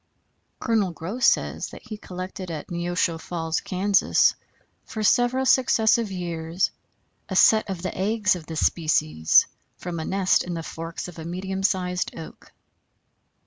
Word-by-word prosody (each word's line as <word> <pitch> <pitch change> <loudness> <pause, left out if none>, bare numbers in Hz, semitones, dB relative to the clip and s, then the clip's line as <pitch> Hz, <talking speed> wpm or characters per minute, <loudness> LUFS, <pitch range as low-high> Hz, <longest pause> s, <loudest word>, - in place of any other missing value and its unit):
Col. 220 -4 +1
Goss 195 +10 -1
says - - +1
that - - -12
he 215 - -7
collected 185 -2 -7
at 160 +1 -6
Neosho 175 -1 -1
Falls, 165 -1 -3
Kansas, 195 +2 +3 0.5
for 220 -2 -5
several 245 +4 +3
successive 230 -4 +3
years 170 -1 -2 0.6
a 190 - -3
set 215 +2 +5
of 185 -2 -5
the 185 - -3
eggs 205 +1 +1
of 165 -3 -9
this 160 -1 0
species 80 - +3 0.3
from 175 -2 -5
a 160 - -4
nest 190 -1 +2
in 175 -1 -5
the 165 - -4
forks 165 +2 -6
of 175 -2 -10
a - - -6
medium 190 +3 -4
sized 180 -2 -1
oak. 160 - -11
180 Hz, 145 wpm, -24 LUFS, 165-205 Hz, 0.6 s, set